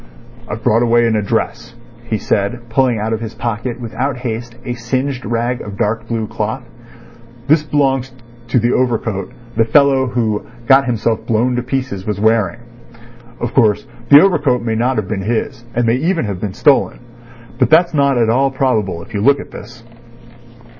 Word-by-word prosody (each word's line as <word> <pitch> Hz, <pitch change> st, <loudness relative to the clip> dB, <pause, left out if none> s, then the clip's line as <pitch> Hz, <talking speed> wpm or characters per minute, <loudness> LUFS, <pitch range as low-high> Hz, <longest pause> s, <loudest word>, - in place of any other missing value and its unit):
"I've 110 Hz, +2 st, -6 dB
brought 115 Hz, +2 st, +3 dB
away 120 Hz, 0 st, +3 dB
an 115 Hz, -1 st, +1 dB
address," 115 Hz, +3 st, -2 dB, 0.3 s
he 115 Hz, -2 st, -1 dB
said, 110 Hz, +4 st, -2 dB
pulling 125 Hz, 0 st, +2 dB
out 110 Hz, +2 st, -2 dB
of 110 Hz, -, -2 dB
his 115 Hz, -1 st, -6 dB
pocket 120 Hz, +1 st, -3 dB
without 125 Hz, +3 st, -3 dB
haste 120 Hz, -1 st, -5 dB
a 125 Hz, -, -2 dB
singed 130 Hz, +2 st, -2 dB
rag 120 Hz, +2 st, -1 dB
of 100 Hz, -1 st, -8 dB
dark 115 Hz, +2 st, -1 dB
blue 115 Hz, -1 st, -2 dB
cloth. 110 Hz, +3 st, -4 dB, 0.8 s
"This 155 Hz, +1 st, +4 dB
belongs 135 Hz, -3 st, 0 dB, 0.4 s
to 125 Hz, -, +1 dB
the 120 Hz, +1 st, +2 dB
overcoat 110 Hz, -6 st, -1 dB, 0.2 s
the 115 Hz, -, +4 dB
fellow 135 Hz, +1 st, +4 dB
who 115 Hz, -4 st, -1 dB, 0.2 s
got 135 Hz, +2 st, +5 dB
himself 115 Hz, -1 st, 0 dB
blown 120 Hz, +3 st, +1 dB
to 125 Hz, -, 0 dB
pieces 130 Hz, -6 st, -3 dB
was 105 Hz, -2 st, -2 dB
wearing. 110 Hz, -1 st, +1 dB, 0.8 s
Of 120 Hz, -, -3 dB
course, 110 Hz, -3 st, +3 dB, 0.2 s
the 145 Hz, +1 st, +9 dB
overcoat 145 Hz, -, +2 dB
may 115 Hz, -1 st, -1 dB
not 120 Hz, +4 st, +1 dB
have 105 Hz, -3 st, -1 dB
been 100 Hz, -2 st, -3 dB
his, 120 Hz, +4 st, -2 dB
and 120 Hz, 0 st, +1 dB
may 115 Hz, +2 st, +2 dB
even 165 Hz, +2 st, 0 dB
have 100 Hz, -3 st, -4 dB
been 100 Hz, -3 st, -3 dB
stolen. 145 Hz, -2 st, +3 dB, 0.6 s
But -, -, +3 dB
that's 170 Hz, +2 st, +4 dB
not 140 Hz, -3 st, +2 dB
at 115 Hz, -2 st, +3 dB
all 135 Hz, +3 st, +2 dB
probable 110 Hz, -10 st, -1 dB
if -, -, -15 dB
you 100 Hz, -, -1 dB
look 140 Hz, +5 st, +4 dB
at -, -, -9 dB
this." 120 Hz, -1 st, -11 dB
120 Hz, 180 wpm, -17 LUFS, 110-130 Hz, 0.8 s, the